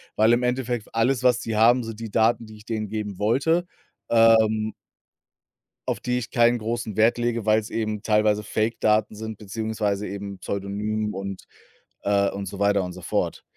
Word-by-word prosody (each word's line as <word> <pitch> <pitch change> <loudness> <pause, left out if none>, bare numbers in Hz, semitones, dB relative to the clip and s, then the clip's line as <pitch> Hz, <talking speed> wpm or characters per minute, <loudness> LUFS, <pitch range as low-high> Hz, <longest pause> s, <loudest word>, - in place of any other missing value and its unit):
weil 110 +2 +4
im 120 +1 +2
Endeffekt 125 -2 -1
alles, 125 +3 +2
was 125 -1 +4
sie 110 -2 -3
haben, 120 +3 +5
sind 115 -1 -7
die 115 -2 -6
Daten, 115 +2 +2
die 110 0 -12
ich 105 - -16
denen 110 -2 -3
geben 105 -3 -4
wollte, 150 +11 +2 0.4
ähm 110 -2 +4 1.1
auf - - -1
die 125 0 -1
ich 120 -1 -5
keinen 120 -1 +3
großen 115 -1 -3
Wert 110 +2 +4
lege, 120 -2 -1
weil's 110 0 +2
eben 110 -1 -3
teilweise 105 -1 +2
Fake-Daten 110 0 +1
sind 110 0 -6
beziehungsweise 105 -1 -2
eben 100 0 -6
Pseudonym 105 +2 -3
und 95 0 -6 0.6
äh, 100 -1 +2
und 100 0 -5
so 100 +2 -7
weiter 100 -1 +3
und 90 - -5
so 90 - -10
fort. - - -2
110 Hz, 175 wpm, -24 LUFS, 105-115 Hz, 1.1 s, haben